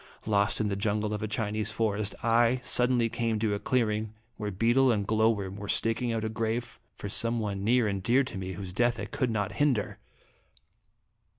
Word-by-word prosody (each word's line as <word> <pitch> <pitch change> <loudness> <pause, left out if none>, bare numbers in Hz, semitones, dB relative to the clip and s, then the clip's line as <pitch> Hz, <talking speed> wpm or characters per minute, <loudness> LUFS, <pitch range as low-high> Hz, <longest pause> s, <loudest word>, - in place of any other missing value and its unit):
Lost 100 -2 +2
in 110 - 0
the 100 - -1
jungle 105 +1 -1
of 105 - -4
a 110 - -2
Chinese 110 0 -2
forest, 105 -2 -1
I 120 +2 +3
suddenly 125 -1 +4
came 115 -1 -1
to 105 -1 0
a 100 - -2
clearing 110 -3 -1 0.2
where 105 -2 -4
beetle 120 +7 +3
and 105 -3 0
glow 110 +1 +3
worm 100 -3 -3
were 105 0 -7
staking 115 +3 0
out 115 -1 -2
a - - -1
grave 115 +2 -3 0.2
for - - -7
some 115 +4 +2
one 100 -3 -3
near 120 +1 +3
and 100 -2 -2
dear 125 +8 +3
to 125 - -6
me, 95 0 -5
whose 90 0 -7
death 120 +3 +1
I 105 - -3
could 125 +3 -2
not 105 -3 -1
hinder. 130 -2 0
110 Hz, 200 wpm, -28 LUFS, 105-115 Hz, 0.2 s, suddenly